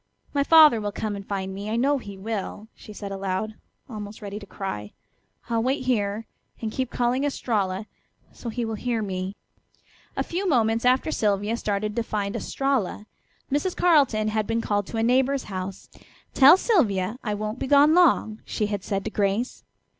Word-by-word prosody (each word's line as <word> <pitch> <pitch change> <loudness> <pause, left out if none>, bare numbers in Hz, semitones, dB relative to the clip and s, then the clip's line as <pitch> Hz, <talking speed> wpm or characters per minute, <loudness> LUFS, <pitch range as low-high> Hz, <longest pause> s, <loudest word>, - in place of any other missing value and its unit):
"My 285 -1 +2
father 305 -7 +7
will 205 0 -2
come 210 0 -3
and 200 - -6
find 190 -1 -4
me, 200 +2 -5
I 220 - -1
know 275 +4 +2
he 200 -5 -9
will," 210 +1 -5
she 215 - -13
said 200 -1 -7
aloud, 195 +2 -2 0.3
almost 210 -3 -7
ready 205 -1 -6
to 200 - -12
cry. 105 - -5 0.5
"I'll 230 -1 0
wait 260 +2 0
here, 215 -3 0 0.3
and 220 -2 -3
keep 260 +1 -2
calling 250 +2 0
'Estralla,' 210 -8 -1 0.5
so 235 - -7
he 235 +1 -2
will 225 - -3
hear 230 0 -2
me." 190 0 -4 0.8
A - - +1
few 370 +3 -2
moments 230 -4 +2
after 255 +5 +3
Sylvia 205 -2 +1
started 210 -1 -2
to 235 - +1
find 205 -3 -3
Estralla 265 -7 -1 0.5
Mrs. 295 +6 0
Carleton 275 -11 +3
had 215 -1 -1
been 230 0 0
called 205 -3 -1
to 230 - -5
a 225 - +1
neighbor's 260 +3 +2
house. 190 -1 -6 0.5
"Tell 285 +6 +8
Sylvia 230 - +1
I 210 -2 -1
won't 215 +3 -4
be - - -2
gone 290 +3 +6
long," 295 -11 +3
she 210 - -2
had 205 -2 -3
said 195 -1 -2
to 220 - -3
Grace. 205 +4 -1
220 Hz, 180 wpm, -25 LUFS, 200-255 Hz, 0.8 s, Tell